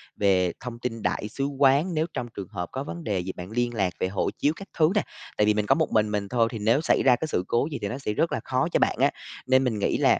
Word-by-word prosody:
về 95 -3 +2
thông 120 -1 -7
tin 115 -2 -4
đại 105 - -1
sứ 135 +5 -3
quán, 140 +5 +3
nếu 155 0 +1
trong 120 - -3
trường 100 -2 -5
hợp 90 -4 -5
có 135 - -3
vấn 170 +3 -7
đề 100 -9 -1
gì 90 +1 -3
bạn 90 +3 -8
liên 120 +1 0
lạc 95 -5 0
về - - +1
hộ 95 +1 -1
chiếu 145 - +2
các 195 - -10
thứ 155 -1 +5
nè. 210 - +4 0.4
Tại 105 - +4
vì 105 - +5
mình 105 0 0
có - - +4
một - - 0
mình 105 -1 +2
mình 100 -1 -2
thôi 115 -2 +2
thì 115 - -5
nếu 115 +7 +3
xảy - - +2
ra 125 -2 +7
cái 160 - -4
sự 90 - -1
cố 120 +4 +1
gì 145 - -3
thì 100 - -1
nó 120 - -4
sẽ 135 -6 -3
rất - - +1
là - - -1
khó - - 0
cho - - +2
bạn - - +2
á, - - +4 0.4
nên 130 0 +4
mình 115 -5 -1
nghĩ - - +1
là - - +4
115 Hz, 305 wpm, -26 LUFS, 105-135 Hz, 0.4 s, ra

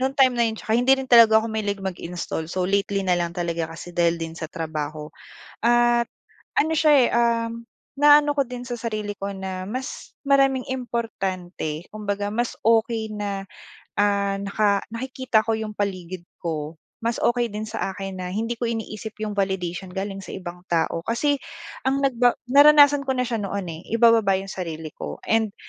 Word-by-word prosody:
nung 265 +1 0
time 260 -2 +5
na 235 - +4
yun 220 - -3
tsaka 220 - -4
hindi 265 +2 +5
rin 265 - -4
talaga 230 -2 +8
ako - - -3
mahilig 205 -2 -2
mag-install. 175 -3 -4
So, 185 +1 -2
lately 200 +1 0
na 180 -1 +2
lang 170 0 -2
talaga 170 -2 -2
kasi 175 - -9
dahil 170 -1 +2
din 165 -1 -5
sa 160 - -4
trabaho. 155 -2 -5 0.5
At 240 0 +4 0.5
ano 315 +2 +3
siya, 310 -1 +4
eh, - - +3
uhm, 230 0 0 0.3
na 295 0 +8
ano 290 0 0
ko 280 - +3
din 245 0 -7
sa 240 - -3
sarili 215 -3 -4
ko 200 0 -3
na 190 -1 -5
mas 255 +6 -6
maraming 270 -2 +3
importante. 195 -10 -3
Kumbaga, 205 -1 -3
mas 235 +2 -1
okey 225 0 +2
na, 200 -2 -3 0.6
ah, 200 -1 +2
naka 200 0 +1
nakikita 255 -1 0
ko 225 - -1
yung 220 -1 -4
paligid 185 -3 -3 0.2
ko. 155 -1 -3 0.2
Mas 230 0 -2
okey 240 0 +2
din 210 -1 -5
sa 215 -3 -3
akin 195 -2 -6
na 180 - -4
hindi 225 +2 -2
ko 240 - -1
iniisip 220 -1 -5
yung 215 - -2
validation 190 -2 -2
galing 195 +2 -5
sa 195 - -8
ibang 180 -1 -8
tao. 165 0 0
Kasi 285 +5 +1 0.5
ang 275 +1 +1
nagba 245 -2 +3 0.2
naranasan 290 0 +7
ko 265 - +1
na 250 - +1
siya 235 -2 -2
noon, 200 -3 -3
eh. 165 +2 -9
Ibababa 230 -4 +5
yung 195 +1 -3
sarili 160 -3 -5
ko - - -8
and, 220 -2 +1
210 Hz, 180 wpm, -24 LUFS, 185-240 Hz, 0.6 s, talaga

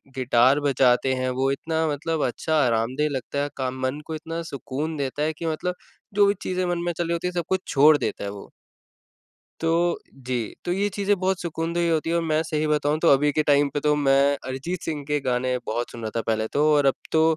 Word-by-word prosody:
Guitar 130 +2 +4
बजाते 130 -2 +3
हैं, 130 0 -1
वो 135 +2 0
इतना 160 +3 -1
मतलब 155 +1 -1
अच्छा 155 +5 -1
आरामदेह 125 +6 +1
लगता 140 +1 -3
है 145 - -2
काम 130 0 -3
मन 130 +3 -1
को 160 - -4
इतना 165 +2 -5
सुकून 145 +2 -4
देता 140 +1 -2
है 155 - 0
कि 165 +2 -7
मतलब 165 +3 -2 0.4
जो 205 0 +5
भी 200 - +3
चीज़ें 185 0 -1
मन 175 0 0
में 175 - +1
चल 175 - 0
रही 170 - -1
होती 170 +1 -1
हैं 180 - -4
सब 175 -2 -2
कुछ 190 -1 +1
छोड़ 150 +2 +6
देता - - -3
है 100 - -3
वो। 100 0 -9 1.1
तो 170 +1 +1 0.2
जी। 125 -4 -4
तो 175 - -1
ये 200 +3 +1
चीज़ें 200 0 +2
बहुत 190 0 0
सुकूनदेह 170 0 -1
होती 160 +1 0
हैं 170 - +1
और 170 - +1
मैं 155 -1 +1
सही 155 -1 -1
बताऊँ 150 0 +1
तो 165 - +3
अभी 145 +2 +4
के 155 - +2
टाइम 145 -1 +3
पे 145 - 0
तो 150 0 +2
मैं 140 0 +3
अरिजीत 155 +7 -4
सिंह 150 -3 -4
के 150 -1 +1
गाने 125 0 0
बहुत 120 +2 -2
सुन 115 - -9
रहा 110 - -3
था 115 - 0
पहले 110 -1 0
तो 150 +1 +4
और 145 -1 +3
अब 135 - +4 0.2
तो 160 - +4
150 Hz, 230 wpm, -24 LUFS, 130-165 Hz, 1.1 s, छोड़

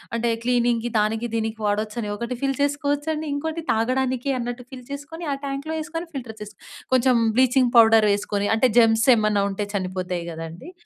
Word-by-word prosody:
అంటే 235 0 0
క్లీనింగ్‌కి 240 -1 +1
దానికి 225 +3 0
దీనికి 220 0 -2
వాడొచ్చని 210 +1 -2
ఒకటి 235 +3 -4
ఫిల్ 275 -1 0
చేసుకోవచ్చండి. 290 +2 -1
ఇంకోటి 320 +3 -3
తాగడానికి 255 +3 0
అన్నట్టు 245 +1 -5
ఫిల్ 255 -1 -9
చేసుకొని 300 +4 -7
ఆ - - -1
ట్యాంక్‌లో 280 +3 -4
వేసుకొని 330 +2 -5
ఫిల్టర్ 240 -5 -6
చేసు 210 0 -9 0.4
కొంచెం 255 0 +4 0.2
బ్లీచింగ్ 255 -1 +4
పౌడర్ 225 -1 +7
వేసుకొని, 205 0 -1
అంటే 250 +3 +3
జెమ్స్ 225 0 +4
ఏమన్నా 215 -2 +1
ఉంటే 205 +1 -3
చనిపోతాయి 185 -2 -3
కదండీ. 165 - -8
240 Hz, 155 wpm, -23 LUFS, 215-275 Hz, 0.4 s, పౌడర్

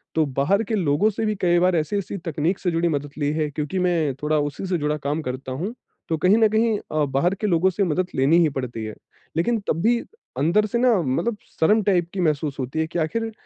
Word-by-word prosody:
तो 160 - +3
बाहर 200 +11 +2
के 220 +1 -2
लोगों 175 +2 +2
से 220 +2 -2
भी 215 -1 0
कई 175 -1 +3
बार 180 0 +3
ऐसी-ऐसी 190 +5 -2
तकनीक 165 +3 -1
से 180 - -1
जुड़ी 165 +1 +1
मदद 145 -1 -2
ली 145 0 +1
है 155 -1 -1
क्योंकि 150 +6 -3
मैं 170 -6 +1
थोड़ा 155 0 +2
उसी 145 +6 -3
से 180 -2 0
जुड़ा 150 0 -1
काम 150 +2 -2
करता 130 +1 -5
हूँ। 180 - -3 0.4
तो 160 - +1
कहीं 185 +7 +4
न 225 - +5
कहीं 220 0 +2
अ, 155 -1 +1
बाहर 140 +8 +1
के 215 - +1
लोगों 180 0 +3
से 200 +3 0
मदद 180 +1 0
लेनी 140 +6 +4
ही 160 - +4
पड़ती 125 -5 -5
है। 110 - -6 0.4
लेकिन 225 +7 +1
तब 165 - 0
भी 235 +1 +3 0.4
अंदर 170 +10 +3
से 235 - -1
ना 250 -1 +4
मतलब 185 - -1 0.2
शर्म 210 +6 +4
टाइप 175 -4 +1
की 195 - -4
महसूस 150 -3 0
होती 130 +5 -3
है 160 - 0
कि 170 +1 -3
आखिर 225 +8 -1
165 Hz, 235 wpm, -23 LUFS, 150-200 Hz, 0.4 s, न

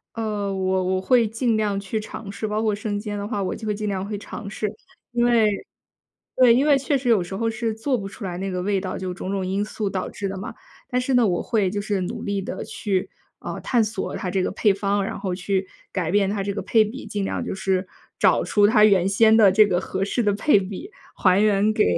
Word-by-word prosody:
呃， 210 -3 -2
我 190 -1 0
我 185 0 0
会 235 +4 +3
尽 225 +1 0
量 210 -2 0
去 200 +2 -3
尝 210 -1 -8
试， 215 +2 -4
包 215 +1 -1
括 215 -2 +1
生 205 0 -3
煎 205 -1 -4
的 200 - -4
话 205 -2 -2
我 190 - -2
就 220 - -8
会 210 - 0
尽 210 0 -3
量 195 -1 -2
会 210 0 -4
尝 210 0 -8
试。 210 0 -3 0.4
因 240 0 +2
为 230 -3 +4 0.9
对， 250 -2 +6
因 265 +4 +3
为 290 -2 +6
确 275 +1 0
实 250 - -3
有 220 -6 +4
时 185 +2 -7
候 225 +1 0
是 225 0 -2
做 255 +4 0
不 195 -3 -5
出 200 +1 -10
来 175 -2 -4
那 195 +1 -3
个 180 -1 -2
味 195 0 0
道， 185 -1 -4
就 185 -1 -4
种 185 - -5
种 195 -2 -2
因 195 +2 0
素 215 -1 -3
导 185 -1 -3
致 200 - -4
的 190 - -5
嘛。 195 - -6 0.3
但 250 -2 0
是 255 +1 -1
呢， 245 -2 +5
我 175 -3 0
会 210 -6 +1
就 205 - -2
是 205 -1 -1
努 180 - -4
力 200 -1 -2
地 190 - -5
去， 195 -3 -2 0.3
呃， - - -6
探 240 -3 +2
索 215 -2 -3
它 185 - -3
这 190 0 0
个 - - -1
配 200 0 +2
方， 200 0 0
然 - - -4
后 185 -2 -2
去 190 +1 -1 0.3
改 175 -4 -1
变 200 0 +3
它 200 0 -1
这 200 +1 -2
个 200 - -3
配 220 -2 +4
比， 245 +7 -7
尽 205 -1 -3
量 - - -2
就 - - -4
是 190 -1 -1 0.3
找 - - +4
出 205 -1 +4
它 210 0 +5
原 195 -3 +4
先 220 +2 +5
的 210 -4 +7
这 215 +2 +6
个 180 -3 +1
合 190 +1 -2
适 230 +4 -1
的 205 - +3
配 215 +1 +4
比， 200 - -7 0.3
还 185 0 +4
原 210 0 +3
给， - - +3
205 Hz, 275 characters per minute, -23 LUFS, 195-220 Hz, 0.9 s, 的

